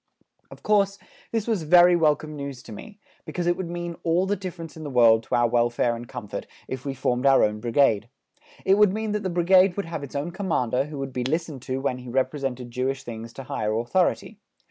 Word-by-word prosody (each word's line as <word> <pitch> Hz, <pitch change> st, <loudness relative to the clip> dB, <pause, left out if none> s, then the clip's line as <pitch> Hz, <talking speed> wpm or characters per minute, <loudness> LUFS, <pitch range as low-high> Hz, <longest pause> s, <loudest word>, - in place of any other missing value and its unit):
Of -, -, -14 dB
course, 200 Hz, -1 st, +2 dB, 0.3 s
this 225 Hz, -2 st, -1 dB
was 220 Hz, -6 st, 0 dB
very 175 Hz, +2 st, +6 dB
welcome 155 Hz, -2 st, +1 dB
news 140 Hz, -3 st, -6 dB
to -, -, -12 dB
me, 205 Hz, -, -10 dB, 0.3 s
because 175 Hz, -, -4 dB
it 175 Hz, 0 st, +2 dB
would 180 Hz, -2 st, -5 dB
mean 175 Hz, -1 st, -5 dB
all 170 Hz, +3 st, +2 dB
the 200 Hz, +2 st, 0 dB
difference 180 Hz, -4 st, -7 dB
in 160 Hz, -, -8 dB
the 145 Hz, -, -5 dB
world 115 Hz, -3 st, +5 dB
to -, -, -1 dB
our 120 Hz, 0 st, +3 dB
welfare 120 Hz, 0 st, +1 dB
and 120 Hz, +1 st, -8 dB
comfort 120 Hz, -5 st, -7 dB, 0.2 s
if 130 Hz, 0 st, -6 dB
we 135 Hz, -1 st, -3 dB
formed 125 Hz, 0 st, 0 dB
our 135 Hz, -1 st, +6 dB
own 105 Hz, 0 st, 0 dB
Brigade. 115 Hz, -2 st, +2 dB, 0.6 s
It 195 Hz, +2 st, +4 dB
would 210 Hz, -2 st, +6 dB
mean 215 Hz, +1 st, -2 dB
that 210 Hz, 0 st, -1 dB
the 190 Hz, -, -2 dB
Brigade 185 Hz, +2 st, +4 dB
would 200 Hz, -, -2 dB
have 165 Hz, -3 st, -5 dB
its 140 Hz, -, -9 dB
own 145 Hz, +5 st, -2 dB
Commander 150 Hz, -, 0 dB
who 150 Hz, 0 st, -8 dB
would 135 Hz, -1 st, -5 dB
be 125 Hz, -, -2 dB
listened 155 Hz, 0 st, -2 dB
to 130 Hz, +1 st, -1 dB
when 130 Hz, -2 st, -1 dB
he 125 Hz, 0 st, -9 dB
represented 130 Hz, -1 st, -2 dB
Jewish 130 Hz, +2 st, -2 dB
things 115 Hz, -1 st, -7 dB
to 135 Hz, -, -8 dB
higher 110 Hz, -5 st, -2 dB
authority. 185 Hz, -, 0 dB
145 Hz, 220 wpm, -25 LUFS, 125-180 Hz, 0.6 s, very